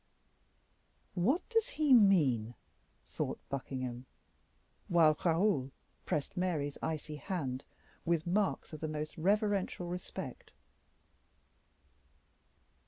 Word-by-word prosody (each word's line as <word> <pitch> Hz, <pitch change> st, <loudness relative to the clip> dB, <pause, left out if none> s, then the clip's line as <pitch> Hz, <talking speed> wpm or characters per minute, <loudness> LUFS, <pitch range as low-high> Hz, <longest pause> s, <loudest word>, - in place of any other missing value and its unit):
"What 240 Hz, -, +1 dB
does 455 Hz, -2 st, +2 dB
he 300 Hz, -3 st, +5 dB
mean?" 145 Hz, -, +5 dB, 0.5 s
thought -, -, -3 dB
Buckingham, 130 Hz, -2 st, -4 dB, 0.8 s
while 160 Hz, -3 st, +5 dB
Raoul 165 Hz, -5 st, +2 dB, 0.4 s
pressed 145 Hz, -, -1 dB
Mary's 160 Hz, -6 st, -1 dB
icy 155 Hz, -1 st, -3 dB
hand 140 Hz, -7 st, -3 dB, 0.4 s
with 165 Hz, -2 st, +1 dB
marks 190 Hz, -1 st, 0 dB
of 155 Hz, -, -6 dB
the 155 Hz, -, -2 dB
most 155 Hz, 0 st, -4 dB
reverential 200 Hz, +1 st, +1 dB
respect. 180 Hz, +1 st, -6 dB
165 Hz, 90 wpm, -33 LUFS, 145-195 Hz, 0.8 s, he